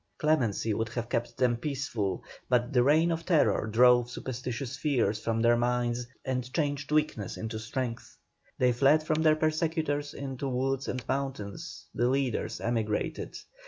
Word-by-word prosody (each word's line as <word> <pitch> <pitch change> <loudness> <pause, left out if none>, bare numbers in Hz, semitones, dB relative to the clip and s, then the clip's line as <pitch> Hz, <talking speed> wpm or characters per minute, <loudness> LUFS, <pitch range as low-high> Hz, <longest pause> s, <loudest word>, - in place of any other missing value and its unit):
Clemency 120 -8 +1
would 115 +2 -1
have 120 0 -4
kept 120 0 -2
them 125 -2 +2
peaceful, 120 - -2 0.3
but 125 0 +2
the 125 - +5
reign 155 +6 +4
of 165 0 -2
terror 160 -10 +2
drove 120 +2 +5
superstitious 125 +1 -4
fears 130 -7 +1
from 115 0 0
their 120 0 +5
minds, 120 0 0 0.2
and 125 -1 -2
changed 145 -2 -1
weakness 150 -10 0
into 110 0 -4
strength. 115 +1 -4 0.4
They 125 -1 +4
fled 140 +5 +4
from 155 0 0
their 155 -1 +5
persecutors 155 -2 -1
into 135 -1 -5
the - - -1
woods 135 +1 -1
and 125 -2 -4
mountains; 135 -7 -4
the 120 +2 +1
leaders 135 -3 -1
emigrated. 110 -3 -2
125 Hz, 155 wpm, -29 LUFS, 120-145 Hz, 0.4 s, the